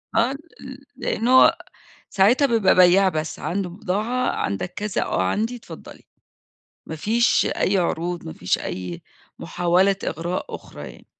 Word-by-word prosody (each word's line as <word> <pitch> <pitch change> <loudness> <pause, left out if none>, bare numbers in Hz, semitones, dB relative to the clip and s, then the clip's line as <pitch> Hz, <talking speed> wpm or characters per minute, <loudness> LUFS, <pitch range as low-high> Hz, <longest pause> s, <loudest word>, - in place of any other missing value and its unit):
آه، 235 +3 +3
ل 275 - -7 0.6
لإن 240 -3 -2
هو 260 +6 +6 0.5
ساعتها 230 +9 +4
بيبقى 225 -7 +3
بيّاع 185 +2 +5
بس، 155 -3 -4
عنده 190 +1 -3
بضاعة 215 +6 -2
"عندك 100 - -3
كذا؟" 210 -1 -2
"آه، - - -1
عندي، 220 - -1
اتفضّلي." 235 - -12 0.8
ما 160 - -6
فيش 230 +9 +2
أي 195 - 0
عروض، 175 0 -2
ما 160 - -6
فيش 90 - -1
أي 90 -2 -6 0.4
محاولة 180 +3 +1
إغراء 175 +3 -4
أخرى - - -9
يعني. - - -18
190 Hz, 140 wpm, -22 LUFS, 170-230 Hz, 0.8 s, هو